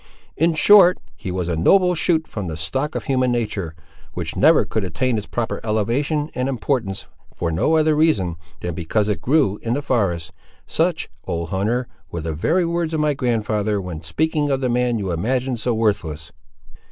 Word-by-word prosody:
'In 165 +1 +2
short, 185 +1 +7 0.2
he 90 +3 -6
was 90 -1 -2
a 85 - -1
noble 180 - +4
shoot 160 -1 +1
from 105 -4 -5
the 80 -2 -4
stock 135 - -2
of - - -2
human 130 -2 +1
nature, 105 -9 -2 0.4
which - - -4
never - - +5
could 110 - -2
attain 120 +8 -1
its 105 -2 -3
proper 120 -1 -3
elevation 130 +8 0
and 130 +1 -1
importance, 120 -6 -2 0.3
for 85 -1 -3
no 155 - +2
other 155 -1 +3
reason, 150 - +2 0.3
than 90 - -3
because 90 +6 -1
it 105 - -1
grew 130 -7 +2
in 115 - -1
the 145 - -3
forest:' 95 - 0 0.3
such, - - 0 0.2
old 85 -1 -3
hunter, 110 +7 -1 0.2
were 85 - -5
the 80 0 -3
very 165 - +1
words 170 -1 -1
of - - -1
my 150 -1 +2
grandfather, 110 -5 0
when 90 -4 -6
speaking 150 - 0
of 135 -1 +1
the 130 -2 -1
man 120 -1 +1
you 95 -4 -2
imagine 125 +9 -1
so 120 +2 -1
worthless!" 85 -9 -1
115 Hz, 185 wpm, -21 LUFS, 95-145 Hz, 0.4 s, short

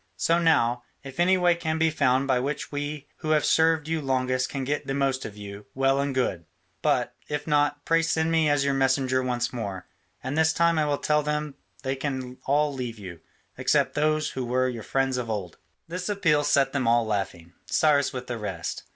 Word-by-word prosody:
So 170 +1 +2
now, 125 -8 +3 0.2
if 135 +3 -10
any 185 +2 +4
way 175 -1 +4
can 160 -2 -2
be 160 0 +2
found 135 -3 +2
by 130 -2 +2
which 140 +3 -3
we 145 0 -4
who 155 - -5
have - - -1
served 160 -2 +3
you 165 -1 -1
longest 130 -1 0
can 135 -2 -3
get 145 +3 -2
the 135 - -1
most 135 -1 0
of 105 - -8
you, 100 0 -9
well 135 +1 +2
and 140 0 -1
good: 95 -10 -1 0.4
but, - - +1
if 150 -1 -3
not, 145 -1 +1
pray 165 0 +3
send 165 0 0
me 160 -2 +3
as 145 -1 +2
your 140 - +2
messenger 130 -1 +2
once 125 -1 -1
more, 100 -7 -5 0.4
and 130 +3 -3
this 160 0 +3
time 170 -1 +3
I 150 - +1
will 145 -1 +1
tell 150 +1 +1
them 150 0 -2 0.3
they 135 0 -1
can 130 -2 -4
all 145 +1 +2
leave 125 -4 -5
you, 90 -5 -9 0.4
except - - +2
those 155 +1 +1
who 130 - -4
were 130 +1 +1
your 120 -3 -4
friends 135 +3 0
of 120 -2 -3
old." 100 -6 -4 0.3
This 180 +3 -4
appeal 165 -8 +2
set 135 -2 +2
them 130 -4 0
all 120 0 +4
laughing, 95 -5 -3
Cyrus 145 -3 +3
with 125 -1 -6
the 120 -2 -5
rest. 95 -5 -4
135 Hz, 210 wpm, -26 LUFS, 125-150 Hz, 0.4 s, any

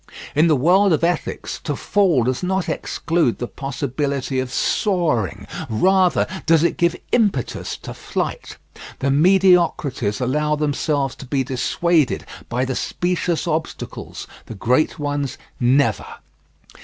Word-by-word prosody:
In 155 +3 +4
the 155 - +4
world 180 +7 +4
of 155 - 0
ethics 170 -1 -2
to 145 - -2
fall 180 - +2
does 125 +1 -1
not 190 0 -1
exclude 160 -3 0
the 120 - -3
possibility 135 0 -3
of 130 -1 -3
soaring, 130 - 0 0.2
rather 185 - +3 0.2
does 165 -1 +5
it 170 - +1
give 170 -1 +2 0.2
impetus 205 - 0
to - - -6
flight. - - -4 0.4
The 140 - 0
mediocrities 160 - +3
allow 150 +4 +1
themselves 145 -2 0
to 135 - -10
be 135 0 0
dissuaded 135 +4 +1 0.2
by 125 +2 0
the 130 0 -3
specious 175 -1 -1
obstacles 160 -1 -4 0.2
the 115 - -7
great 125 +9 +1
ones 145 -3 -2 0.2
never. 125 -2 +2
150 Hz, 130 wpm, -21 LUFS, 130-175 Hz, 0.4 s, does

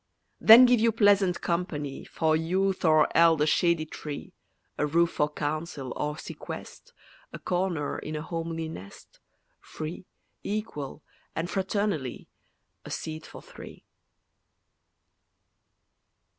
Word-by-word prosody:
Then 230 +3 +10
give 245 -1 +4
you 230 +1 +3
pleasant 205 -4 +3
company, 150 -5 -3
For 160 -1 +1
youth 185 +4 0
or 155 -2 +4
eld 165 -2 +6
a 150 - +3
shady 170 0 +2
tree; 150 -1 -8 0.5
A 150 - +2
roof 170 +3 +2
for 150 - 0
council 150 -3 -4
or 150 0 -2
sequest, - - -9 0.4
A - - -7
corner 175 -5 -2
in 155 - -6
a 150 - -4
homely 165 -1 -4
nest, 100 - -11 0.4
Free, 160 +4 -7 0.3
equal, 180 -9 -5 0.3
and 165 +2 -3
fraternally, 190 - -2 0.6
A - - -10
seat 155 0 -5
for - - -12
three. - - -12
165 Hz, 115 wpm, -27 LUFS, 150-185 Hz, 0.6 s, Then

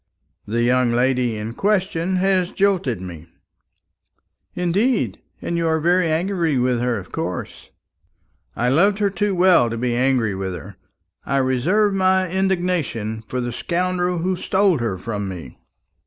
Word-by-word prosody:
"The 115 +3 0
young 125 0 +3
lady 125 -1 +1
in 110 +2 -5
question 190 - 0
has 185 -1 +2
jilted 190 - 0
me." 85 -3 -9 1.3
"Indeed! 200 +8 0 0.2
And 170 - -2
you 165 -1 0
are 160 0 +1
very 175 +1 +2
angry 170 -3 0
with 125 -1 +1
her, 120 -1 0
of 95 - -9
course?" - - -5 0.9
"I 120 +1 +1
loved 195 +9 +3
her 205 -2 +1
too 205 0 -1
well 175 -9 +5
to 115 - -4
be 120 0 -1
angry 125 -4 +1
with 95 -1 -4
her. - - -10 0.5
I 140 - -1
reserve 150 - +2
my 190 -1 +2
indignation 175 - -1
for 125 - -3
the 120 -1 -2
scoundrel 180 +5 -1
who 185 +3 0
stole 190 -2 +2
her 115 -5 -2
from 100 0 -4
me." 85 -9 -9
160 Hz, 150 wpm, -21 LUFS, 120-185 Hz, 1.3 s, well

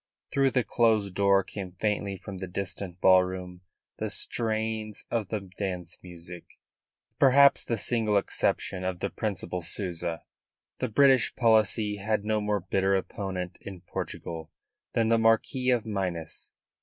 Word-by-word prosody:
Through 135 -1 +3
the 125 -1 +1
closed 110 -6 +2
door 100 0 +4
came 95 -2 -7
faintly 100 0 -1
from 95 0 -8
the 95 - -5
distant 95 0 -5
ballroom 90 -1 +3 0.4
the - - -2
strains 110 -2 -1
of 110 -4 0
the 110 - -2
dance 90 -2 -5
music. 90 0 -10 0.6
With - - -40
perhaps 140 +1 +6
the 115 - -1
single 110 -1 +1
exception 95 -1 0
of 95 -1 -2
the - - -2
Principal 90 -4 -3
Souza, 85 -2 -3 0.6
the 130 - -1
British 135 +2 +4
policy 110 -2 +3
had 105 +1 -1
no 110 0 +1
more 105 -1 0
bitter 95 +2 +1
opponent 95 -1 -4
in 95 -3 -9
Portugal 80 -2 -6 0.4
than 115 -1 +2
the 115 0 +4
Marquis 115 +3 +2
of 120 -3 +2
Minas. 90 -6 -3
100 Hz, 145 wpm, -28 LUFS, 90-110 Hz, 0.6 s, perhaps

